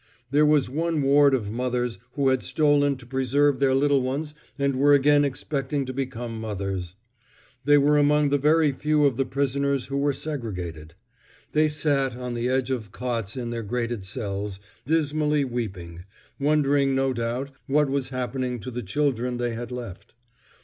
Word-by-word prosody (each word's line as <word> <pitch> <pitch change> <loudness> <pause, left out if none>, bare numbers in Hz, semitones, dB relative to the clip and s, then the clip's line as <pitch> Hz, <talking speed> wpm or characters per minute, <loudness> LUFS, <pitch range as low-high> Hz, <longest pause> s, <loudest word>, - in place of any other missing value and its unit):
There 150 +2 +4
was 150 -3 +3
one 160 +3 -1
ward 140 0 +5
of 105 -5 -3
mothers 125 0 -2
who 140 -2 +2
had 130 -1 +1
stolen 145 -2 +2
to 125 - -14
preserve 135 +2 +1
their 135 -1 +3
little 140 0 +3
ones 140 +4 -3 0.2
and 140 -1 0
were 145 +2 +5
again 145 +1 +4
expecting 140 0 -2
to 130 - -5
become 120 -4 -4
mothers. 95 -4 -4 0.7
They 145 0 +6
were 145 +1 +4
among 145 0 +3
the 145 0 +2
very 155 +1 +4
few 150 +2 +1
of 135 -4 +2
the 135 +1 -1
prisoners 140 0 0
who 140 +1 -3
were 145 +1 +2
segregated. 90 - -5 0.6
They 155 0 +3
sat 140 -4 0
on 125 -1 -5
the 120 +1 -1
edge 130 0 0
of 110 -6 -3
cots 115 -2 -3
in 120 -2 -4
their 115 -1 -3
grated 115 0 -3
cells, 100 -1 -4 0.3
dismally 150 -2 +1
weeping, 95 -9 -5 0.3
wondering 140 -2 +2
no 135 0 +1
doubt 120 +3 -3 0.2
what 150 +1 +3
was 135 -1 -1
happening 125 -1 -3
to 130 - -6
the 125 +1 -4
children 125 +2 -1
they 120 -1 -1
had 120 +2 -6
left. 120 -7 -8
135 Hz, 170 wpm, -25 LUFS, 120-145 Hz, 0.7 s, They